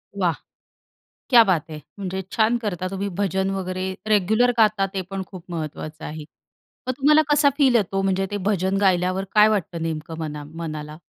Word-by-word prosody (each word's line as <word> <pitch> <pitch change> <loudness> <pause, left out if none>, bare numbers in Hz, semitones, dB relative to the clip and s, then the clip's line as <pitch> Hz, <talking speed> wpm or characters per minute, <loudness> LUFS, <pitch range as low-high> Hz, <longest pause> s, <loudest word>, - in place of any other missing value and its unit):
वाह! 180 -4 +1 1.0
क्या 240 -2 +9
बात 175 -5 0
है. 155 -1 -7 0.2
म्हणजे 190 -1 -4
छान 225 +2 +3
करता 185 -5 -3
तुम्ही 195 +1 -3
भजन 190 0 0
वगैरे, 185 0 -3
रेग्युलर 215 +4 +3
गाता 215 -3 +4
ते 190 - -1
पण 195 -1 -3
खूप 185 -3 -11
महत्त्वाचं 155 -1 -6
आहे. 155 0 -6 0.6
मग - - +2
तुम्हाला 300 +3 +5
कसा 290 -1 +5
फील 265 -4 +4
येतो? 195 -3 0
म्हणजे 195 0 0
ते 205 - -2
भजन 190 -1 0
गायल्यावर 185 0 +2
काय 210 0 +7
वाटतं 200 -5 -1
नेमकं 160 0 -4
मना 150 -2 -5
मनाला? 155 -2 -6
190 Hz, 165 wpm, -23 LUFS, 165-210 Hz, 1.0 s, क्या